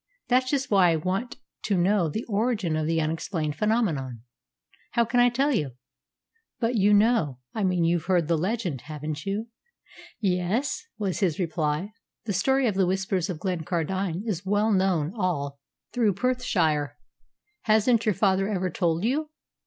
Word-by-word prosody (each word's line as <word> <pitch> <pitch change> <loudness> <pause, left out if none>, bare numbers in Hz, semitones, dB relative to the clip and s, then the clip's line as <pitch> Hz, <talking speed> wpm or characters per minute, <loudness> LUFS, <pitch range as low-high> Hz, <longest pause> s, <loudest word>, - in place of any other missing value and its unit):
"That's 255 +1 +3
just 270 -3 -1
why 190 -3 +5
I 165 - +3
want 185 +9 -2 0.3
to 200 -3 +1
know 180 -1 +2
the 220 +10 -3
origin 210 -6 0
of 155 0 -1
the 165 0 +1
unexplained 155 -1 -2
phenomenon." 165 - 0 0.7
"How 235 -1 +3
can 245 +2 +1
I 245 0 +6
tell 270 +5 +1
you?" 150 - -1 0.9
"But 230 0 0
you 205 -3 +3
know 205 - +3 0.2
I 215 - -2
mean 180 -2 +2
you've 170 -1 +1
heard 175 -4 +2
the 170 - +2
legend, 180 - -2
haven't 150 +1 -6
you?" 210 +4 -2 0.7
"Yes," 195 +6 -1
was 200 -4 -2
his 175 -6 +1
reply. 165 +2 -1 0.3
"The 210 - -1
story 265 +8 +2
of 220 - +2
the 190 -1 +2
Whispers 190 0 -1
of 180 - -3
Glencardine 180 +1 -2
is 195 -5 -2
well 205 +3 +1
known 185 -5 +1
all 145 -9 -2 0.3
through 225 -5 +2
Perthshire. 165 - 0 0.7
Hasn't 220 +2 +3
your 210 - +3
father 195 -1 +2
ever 185 -3 -1
told 170 0 0
you?" 295 +7 0
190 Hz, 160 wpm, -26 LUFS, 165-220 Hz, 0.9 s, I